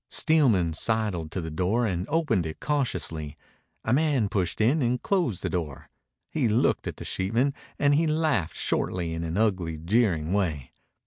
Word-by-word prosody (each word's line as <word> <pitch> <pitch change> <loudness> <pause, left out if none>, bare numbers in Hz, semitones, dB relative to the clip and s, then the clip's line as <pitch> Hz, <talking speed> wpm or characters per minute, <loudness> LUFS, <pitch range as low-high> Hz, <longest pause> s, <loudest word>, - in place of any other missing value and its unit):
Steelman 115 - +2
sidled 105 -4 -1
to 95 - -4
the 80 -1 -5
door 95 +9 +1
and 90 -3 -2
opened 150 - +1
it 80 - -7
cautiously. 85 - -2 0.5
A 110 - +2
man 140 -7 +2
pushed 90 -5 -1
in 130 +8 +3
and 125 0 +1
closed 170 - 0
the - - 0
door. 80 -7 -4 0.4
He 145 -6 +1
looked 110 +2 +1
at - - -5
the - - -8
sheepman 115 +9 0 0.2
and 145 0 +3
he 160 +3 +3
laughed 155 - 0
shortly 85 -2 -1
in 80 0 -3
an 85 +2 -3
ugly, 95 -7 0
jeering 85 -2 +1
way. 80 -10 -1
105 Hz, 170 wpm, -26 LUFS, 85-135 Hz, 0.5 s, in